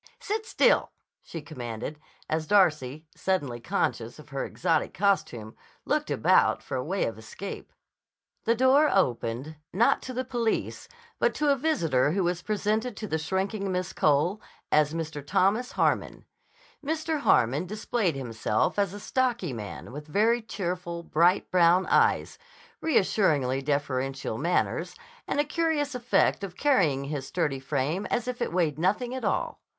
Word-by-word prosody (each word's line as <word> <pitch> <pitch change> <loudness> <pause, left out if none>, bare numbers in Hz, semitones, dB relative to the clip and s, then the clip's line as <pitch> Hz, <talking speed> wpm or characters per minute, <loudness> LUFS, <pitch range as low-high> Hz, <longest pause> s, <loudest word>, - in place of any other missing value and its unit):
Sit 435 +1 -3
still," - - +3 0.3
she 165 -3 -8
commanded 125 0 -6 0.3
as 155 0 -2
Darcy, 155 -7 +2
suddenly 145 -11 -1
conscious 120 0 -2
of 150 -1 -14
her 140 -1 -3
exotic 165 -3 -1
costume, 125 - 0 0.3
looked - - 0
about - - +3
for - - -5
a 125 - -1
way 190 +7 -1
of 110 -1 -4
escape. 150 - -8 0.7
The 230 - +3
door 265 +5 +5
opened, 130 - 0
not 225 +6 +3
to 255 - -7
the 255 +1 -2
police, 240 -3 -2 0.3
but - - +2
to 300 -1 +2
a - - +4
visitor 165 - +1
who 195 0 +1
was 175 0 -1
presented 215 +3 -1
to 215 - -5
the 160 -4 -1
shrinking 190 +4 -2
Miss 180 0 -2
Cole 155 +8 +2 0.3
as 150 -1 +4
Mr. 160 -3 -4
Thomas 200 - +1
Harmon. - - 0 0.6
Mr. 315 +1 -1
Harmon 140 - +3
displayed 210 - -1
himself 115 - -1
as 200 -1 0
a - - -7
stocky 240 - -1
man 105 -1 -7
with 150 +3 -8
very 225 +9 +2
cheerful, 180 -5 -4
bright 170 +3 +2
brown 180 +1 +5
eyes, - - +2 0.4
reassuringly 155 - +2
deferential 135 -4 -2
manners, 170 +4 0 0.3
and - - -1
a - - +5
curious 300 -2 0
effect 245 -4 +1
of 180 -2 -6
carrying 175 - +2
his 140 -1 -4
sturdy 150 -6 -1
frame 145 +7 -2
as 240 0 -1
if 250 -1 -4
it - - -1
weighed 165 -4 0
nothing 210 +8 0
at 260 - -5
all. - - -1
175 Hz, 150 wpm, -27 LUFS, 140-220 Hz, 0.7 s, door